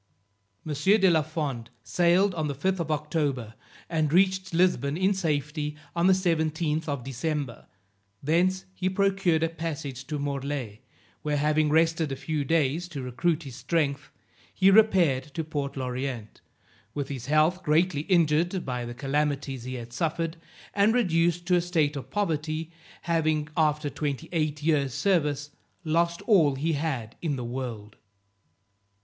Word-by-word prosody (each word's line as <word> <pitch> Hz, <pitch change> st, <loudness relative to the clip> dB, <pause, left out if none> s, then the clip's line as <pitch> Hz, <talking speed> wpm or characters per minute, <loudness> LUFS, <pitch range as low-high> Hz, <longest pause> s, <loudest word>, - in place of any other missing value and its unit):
M. 155 Hz, -, -2 dB
de 190 Hz, +6 st, +4 dB
la 160 Hz, -2 st, +4 dB
Fond 145 Hz, -7 st, -4 dB
sailed 180 Hz, +3 st, +3 dB
on 160 Hz, -3 st, -2 dB
the 140 Hz, -, -3 dB
5th 190 Hz, +7 st, 0 dB
of 165 Hz, -2 st, -2 dB
October, 145 Hz, -6 st, -1 dB, 0.3 s
and 155 Hz, -3 st, 0 dB
reached 190 Hz, +2 st, +2 dB
Lisbon 165 Hz, -5 st, +2 dB
in 190 Hz, +2 st, +2 dB
safety 150 Hz, -4 st, -2 dB, 0.2 s
on 170 Hz, +1 st, +3 dB
the 190 Hz, -, +6 dB
17th 160 Hz, -3 st, 0 dB
of 140 Hz, -4 st, -3 dB
December; 135 Hz, 0 st, -4 dB, 0.6 s
thence 185 Hz, +5 st, +2 dB
he 185 Hz, 0 st, -1 dB
procured 190 Hz, -4 st, +2 dB
a -, -, +3 dB
passage 145 Hz, -5 st, -5 dB
to 150 Hz, -, -3 dB
Morlaix, 140 Hz, -6 st, -3 dB, 0.4 s
where 150 Hz, -1 st, -1 dB
having 150 Hz, +1 st, +2 dB
rested 160 Hz, -1 st, +2 dB
a -, -, -1 dB
few 150 Hz, +2 st, -2 dB
days 160 Hz, +3 st, +1 dB
to 145 Hz, -6 st, -6 dB
recruit 155 Hz, +6 st, 0 dB
his 135 Hz, -4 st, -9 dB
strength, 150 Hz, -3 st, -1 dB, 0.4 s
he 195 Hz, 0 st, +4 dB
repaired 185 Hz, -11 st, +4 dB
to 165 Hz, -, -1 dB
Port 145 Hz, -3 st, -4 dB
L'Orient, 125 Hz, -3 st, -4 dB, 0.5 s
with 145 Hz, -2 st, -3 dB
his 130 Hz, -3 st, -6 dB
health 155 Hz, +5 st, +3 dB
greatly 155 Hz, -1 st, +2 dB
injured 175 Hz, +1 st, +2 dB
by 125 Hz, -2 st, -3 dB
the 120 Hz, 0 st, -7 dB
calamities 140 Hz, -1 st, -1 dB
he 130 Hz, 0 st, -4 dB
had 120 Hz, -1 st, -8 dB
suffered, 165 Hz, +4 st, -1 dB, 0.4 s
and 205 Hz, +3 st, +3 dB
reduced 175 Hz, -6 st, +2 dB
to 180 Hz, 0 st, +3 dB
a 175 Hz, -, +3 dB
state 160 Hz, -4 st, +1 dB
of 140 Hz, -, -6 dB
poverty, 160 Hz, -4 st, -2 dB, 0.3 s
having 155 Hz, -3 st, +1 dB
after 150 Hz, -1 st, +1 dB
twenty 145 Hz, -3 st, -3 dB
eight 155 Hz, -3 st, -1 dB
years 140 Hz, -5 st, +1 dB
service, 145 Hz, -4 st, +1 dB, 0.3 s
lost 170 Hz, +1 st, 0 dB
all 165 Hz, -, +4 dB
he 160 Hz, +5 st, 0 dB
had 135 Hz, -7 st, -3 dB
in 155 Hz, -4 st, -1 dB
the 125 Hz, -2 st, -4 dB
world. 120 Hz, -4 st, -6 dB
155 Hz, 150 wpm, -27 LUFS, 140-170 Hz, 0.6 s, the